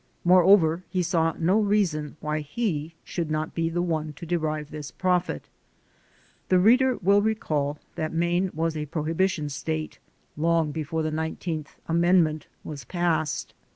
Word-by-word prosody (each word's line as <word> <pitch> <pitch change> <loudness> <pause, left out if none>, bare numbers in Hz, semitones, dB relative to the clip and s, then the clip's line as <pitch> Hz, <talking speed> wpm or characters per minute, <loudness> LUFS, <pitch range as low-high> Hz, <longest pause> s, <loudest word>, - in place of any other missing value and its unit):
Moreover, 180 -1 +5
he 185 -2 0
saw 165 -2 +1
no 180 +6 +3
reason 185 -9 0
why 150 0 -1
he 160 -1 -3
should 170 -3 -3
not 155 +1 -2
be 165 -1 0
the 175 +1 -1
one 155 -3 -2
to 170 - -9
derive 155 -3 -2
this 150 -1 -6
benefit. 180 -1 -1 1.0
The 185 - +5
reader 250 +6 +5
will 200 +2 +5
recall 155 -10 -1 0.2
that 155 0 -3
Maine 175 +3 +1
was 165 0 0
a 150 -1 -3
prohibi 165 +5 0
tion 150 -5 -3
state 155 +2 -4 0.4
long 165 0 +1
before 160 +1 -2
the 155 - -1
Nineteenth 160 0 -4
Amendment 165 -2 +3 0.2
was 145 -4 -7
passed. 165 +1 -1
165 Hz, 150 wpm, -26 LUFS, 155-180 Hz, 1.0 s, Moreover